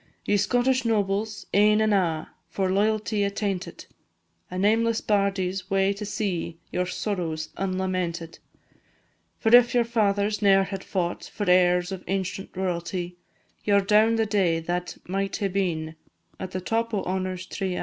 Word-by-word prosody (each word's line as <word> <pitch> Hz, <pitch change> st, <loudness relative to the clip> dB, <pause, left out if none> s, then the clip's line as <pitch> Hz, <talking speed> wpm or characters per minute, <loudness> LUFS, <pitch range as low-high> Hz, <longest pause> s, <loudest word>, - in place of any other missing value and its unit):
Ye 205 Hz, -, +2 dB
Scottish 245 Hz, +6 st, +2 dB
nobles, 210 Hz, -1 st, -1 dB
ane 210 Hz, +1 st, +5 dB
and 215 Hz, -1 st, +3 dB
a', 165 Hz, -5 st, 0 dB, 0.2 s
For 190 Hz, -1 st, -1 dB
loyalty 215 Hz, +1 st, +1 dB
attainted, 200 Hz, -1 st, -3 dB, 0.6 s
A 180 Hz, -, -5 dB
nameless 225 Hz, +3 st, +2 dB
bardie 200 Hz, -3 st, +1 dB
's 190 Hz, -1 st, -6 dB
wae 195 Hz, 0 st, +2 dB
to 205 Hz, +1 st, -6 dB
see 190 Hz, -6 st, -3 dB
Your 180 Hz, 0 st, -1 dB
sorrows 175 Hz, -5 st, -3 dB
unlamented; 185 Hz, -3 st, -2 dB, 1.0 s
For 225 Hz, +1 st, +5 dB
if 245 Hz, 0 st, +5 dB
your 240 Hz, -, +5 dB
fathers 210 Hz, -2 st, +1 dB
ne'er 195 Hz, -1 st, +5 dB
had 195 Hz, 0 st, -5 dB
fought 175 Hz, -3 st, -2 dB
For 205 Hz, -2 st, -5 dB
heirs 180 Hz, 0 st, +4 dB
of 190 Hz, -1 st, -6 dB
ancient 190 Hz, -1 st, -3 dB
royalty, 175 Hz, -1 st, -3 dB, 0.5 s
Ye 205 Hz, -, +3 dB
're -, -, +6 dB
down 215 Hz, +3 st, +4 dB
the 225 Hz, 0 st, +2 dB
day 190 Hz, -6 st, +1 dB
that 175 Hz, +1 st, -3 dB
might 195 Hz, +2 st, -2 dB
hae 200 Hz, -, -1 dB
been 170 Hz, -5 st, -1 dB, 0.5 s
At 190 Hz, -, -5 dB
the 185 Hz, 0 st, -4 dB
top 230 Hz, +3 st, -1 dB
o' 195 Hz, -, -1 dB
honour's 185 Hz, -1 st, -3 dB
tree 190 Hz, -1 st, -3 dB
a'. -, -, -3 dB
195 Hz, 160 wpm, -25 LUFS, 180-210 Hz, 1.0 s, re